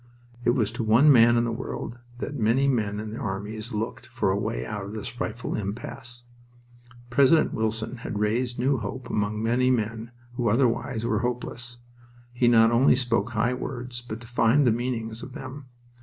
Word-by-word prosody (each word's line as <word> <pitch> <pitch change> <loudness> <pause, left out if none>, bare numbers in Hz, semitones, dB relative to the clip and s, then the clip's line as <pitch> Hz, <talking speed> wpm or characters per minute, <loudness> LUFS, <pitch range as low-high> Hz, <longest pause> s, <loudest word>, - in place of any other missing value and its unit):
It 120 0 +3
was 110 -5 +1
to 115 0 -3
one 115 +7 +6
man 120 -2 +6
in 115 - +3
the 120 - -1
world 120 0 -5 0.2
that 135 - -4
many 125 +3 +2
men 105 -6 0
in 110 0 -5
all - - -5
armies 105 +4 -5
looked 110 +1 -4
for - - 0
a - - +1
way - - -2
out 105 +9 -4
of 100 +2 -7
this 110 -1 -5
frightful 120 0 -4
impasse. 120 +4 -5 0.9
President 140 +5 +4
Wilson 110 +2 -2
had 110 - -5
raised 115 +4 0
new 130 +1 +1
hope 125 +3 -6
among 105 +1 -1
many 125 +3 +2
men 115 -1 -1 0.2
who 120 -2 0
otherwise 115 0 +1
were 110 -3 +1
hopeless. 120 0 -4 0.6
He 120 0 +2
not 115 -1 +6
only 125 +2 +5
spoke 120 -2 0
high 115 +2 +1
words, 125 -1 -5
but 120 -2 -6
defined 120 +3 +2
the 120 - +5
meanings 115 -1 -2
of 130 - -9
them. 130 +1 -8
120 Hz, 180 wpm, -26 LUFS, 110-125 Hz, 0.9 s, one